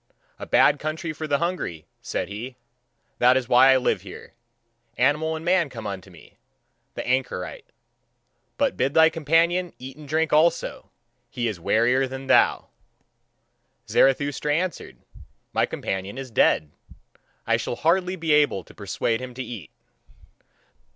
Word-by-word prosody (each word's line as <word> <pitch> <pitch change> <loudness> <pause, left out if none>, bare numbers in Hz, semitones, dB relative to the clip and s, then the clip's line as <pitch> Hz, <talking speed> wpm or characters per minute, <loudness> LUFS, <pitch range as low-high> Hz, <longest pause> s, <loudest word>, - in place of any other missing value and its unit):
"A - - -7
bad 145 0 +4
country 155 +1 -4
for 155 +1 -6
the 145 - +2
hungry," 170 - -3 0.2
said - - -3
he; 115 +6 -7 0.6
"that 125 +1 +5
is 125 -2 -2
why 130 +2 +6
I 130 - +5
live 130 - 0
here. - - -11 0.6
Animal 150 +5 +1
and 160 +1 -7
man 175 -3 +2
come 115 -4 -9
unto 100 -1 -6
me, 85 -3 -18 0.6
the - - -5
anchorite. 125 -8 -2 0.9
But - - +1
bid 135 +3 -1
thy 160 0 +6
companion 165 +3 +1
eat 130 +2 -10
and 150 -2 -12
drink 160 +1 0
also, 160 +3 +1 0.4
he 120 -1 -2
is 105 -6 -4
wearier 125 +8 +2
than 135 +1 -7
thou." - - +3 1.2
Zarathustra 145 +2 +2
answered: 180 +2 -3 0.6
"My - - +2
companion 95 +4 -4
is 135 -2 -7
dead; 75 -8 +2 0.7
I - - +2
shall - - -4
hardly 180 +3 +1
be 165 -3 -2
able 145 -11 +2
to - - -17
persuade 115 +1 -2
him 125 -1 -8
to 130 - -4
eat." 115 -8 -8
135 Hz, 145 wpm, -24 LUFS, 120-160 Hz, 1.2 s, why